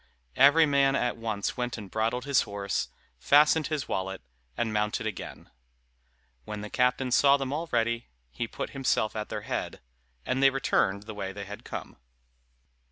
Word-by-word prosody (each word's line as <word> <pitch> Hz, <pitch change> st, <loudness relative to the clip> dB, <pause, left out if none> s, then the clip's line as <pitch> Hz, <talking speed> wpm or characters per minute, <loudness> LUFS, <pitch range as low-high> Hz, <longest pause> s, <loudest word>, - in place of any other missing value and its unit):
Every 145 Hz, +4 st, +7 dB
man 140 Hz, -2 st, +3 dB
at 125 Hz, -3 st, 0 dB
once 110 Hz, -3 st, -3 dB
went 125 Hz, -1 st, -2 dB
and 100 Hz, -4 st, -9 dB
bridled 115 Hz, +3 st, -1 dB
his 140 Hz, -2 st, +3 dB
horse, 100 Hz, -2 st, -3 dB, 0.3 s
fastened 150 Hz, -, +5 dB
his 150 Hz, -3 st, -3 dB
wallet, 95 Hz, -5 st, -3 dB, 0.3 s
and 110 Hz, -2 st, -1 dB
mounted 105 Hz, +2 st, 0 dB
again. 110 Hz, -4 st, -6 dB, 0.9 s
When 105 Hz, -1 st, -6 dB
the 105 Hz, -, -7 dB
captain 125 Hz, +1 st, +1 dB
saw 140 Hz, +2 st, +5 dB
them 135 Hz, -1 st, -3 dB
all 165 Hz, +3 st, -3 dB
ready, 115 Hz, 0 st, 0 dB, 0.2 s
he 115 Hz, -, -3 dB
put -, -, -5 dB
himself 130 Hz, -5 st, 0 dB
at 105 Hz, -1 st, -4 dB
their -, -, -4 dB
head, -, -, -4 dB, 0.5 s
and 130 Hz, +1 st, 0 dB
they 135 Hz, -, +7 dB
returned 100 Hz, -7 st, +1 dB
the 110 Hz, 0 st, -8 dB
way 100 Hz, -2 st, -4 dB
they 100 Hz, 0 st, -7 dB
had 105 Hz, +1 st, -9 dB
come. -, -, -7 dB
120 Hz, 165 wpm, -28 LUFS, 105-135 Hz, 0.9 s, Every